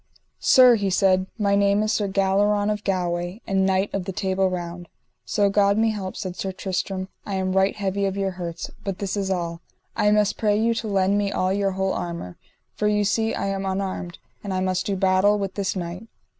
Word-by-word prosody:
Sir, 255 -1 +7
he 200 -2 0
said, 185 0 +3
my 200 -2 +2
name 200 +1 +3
is 215 - 0
Sir 205 -1 0
Galleron 205 +2 +2
of 210 0 -3
Galway, 175 0 -2
and 195 -1 +1
knight 190 +1 +1
of 195 -2 -2
the 190 - -3
Table 190 0 0
Round. 175 -1 -5 0.4
So 205 -1 +2
God 200 0 +3
me 225 0 +3
help, 195 -3 -5
said 185 -3 -5
Sir 190 - -3
Tristram, 190 0 -3 0.2
I 200 - -4
am 190 0 -1
right 190 +1 +2
heavy 200 -1 -1
of 195 0 -2
your 195 -1 0
hurts; 175 -2 -6
but 195 -2 -3
this 200 -1 -3
is 195 -2 -2
all, 170 -2 -2 0.3
I 210 -2 +3
must 210 -1 +2
pray 210 -1 +2
you 230 +1 +2
to 230 -1 -4
lend 200 0 +2
me 200 -1 0
all 185 -1 0
your 195 -1 0
whole 190 0 0
armour, 170 - -5 0.4
for 210 - -1
ye 210 0 +2
see 220 +2 +1
I - - -2
am 195 0 -2
unarmed, 190 -2 -3 0.3
and 195 -2 -3
I - - 0
must 185 0 -1
do 200 - 0
battle 190 +2 +3
with 195 -2 -3
this 195 -2 -2
knight. 180 +4 -5
195 Hz, 215 wpm, -24 LUFS, 185-205 Hz, 0.4 s, Sir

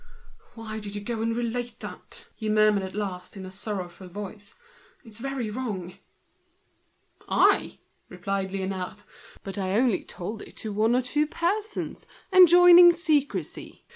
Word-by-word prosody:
"Why 220 -1 -6
did 205 -1 -7
you 205 - -4
go 225 +1 -4
and 230 0 0
relate 240 0 -3
that?" - - -7
he 220 -2 -5
murmured 215 -1 +4
at 190 0 -7
last, 195 -2 -5
in 190 - -7
a - - -8
voice 190 +2 -12
full 190 -3 -5
of 180 - -17
grief. 205 0 -8 0.5
"It's 220 -1 -10
very 265 -4 -3
bad." 205 -7 -5 1.3
"I?" - - +3 0.3
replied 195 -2 -3
Liénard; 190 +1 -4 0.4
"but 195 +1 -5
I 190 -1 -1
only 230 -1 +2
told 210 +5 -6
it - - -12
to 215 -2 -5
one 220 +3 +2
or 255 - +2
two 295 +4 0
persons, 400 +7 -3 0.3
enjoining 355 -1 +9
secrecy. 315 -5 -1
215 Hz, 150 wpm, -26 LUFS, 195-255 Hz, 1.3 s, enjoining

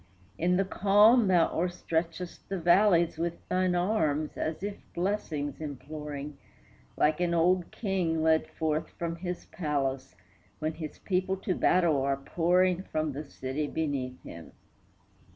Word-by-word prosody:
In 180 +2 +1
the 195 - +2
calm 205 +4 +5
thou 175 -3 +4
o'erstretchest 170 0 -3
the 195 - -2
valleys 175 -1 +4
With 170 0 -3
thine 185 -1 +1
arms, 160 -6 0
as 160 +4 -3
if 205 0 -3 0.2
blessings 160 -7 -2
imploring, 145 0 -6 0.6
Like 150 +1 +2
an 175 -1 +1
old 175 +1 +2
king 180 -6 -1
led 160 0 +3
forth 155 -1 -2
from 170 -1 -3
his 180 0 -5
palace, 135 - -2 0.4
When 155 +1 -2
his 155 -1 -7
people 190 0 -1
to 190 - +1
battle 170 -6 +3
are 135 0 +1
pouring 180 +5 +2
From 155 -5 -2
the 140 +1 -7
city 135 +3 -3
beneath 140 -5 -3
him. 85 -1 -10
165 Hz, 135 wpm, -29 LUFS, 150-185 Hz, 0.6 s, calm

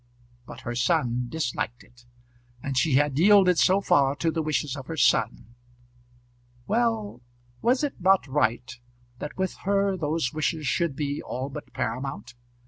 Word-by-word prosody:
But - - -10
her 120 - -4
son 125 0 0
disliked 125 -5 -3
it, 120 0 -23 0.6
and 140 -1 -3
she 130 +2 +2
had 145 0 +2
yielded 190 -2 +5
so 190 +2 +4
far 140 -7 +3
to 165 +2 0
the 160 - -1
wishes 150 -3 -1
of 135 -2 -8
her 165 - -5
son. 105 - +1 1.1
Well; 220 - -1 0.4
was 255 +4 +2
it 285 -9 -3
not 190 +1 +4
right 130 -2 -1 0.4
that 150 - -7
with 190 0 -1
her 200 0 +1
those 155 -5 -1
wishes 155 0 -1
should 165 0 0
be 145 0 -3
all 130 +2 -5
but 135 - -9
paramount? 125 0 -4
150 Hz, 150 wpm, -26 LUFS, 130-185 Hz, 1.1 s, yielded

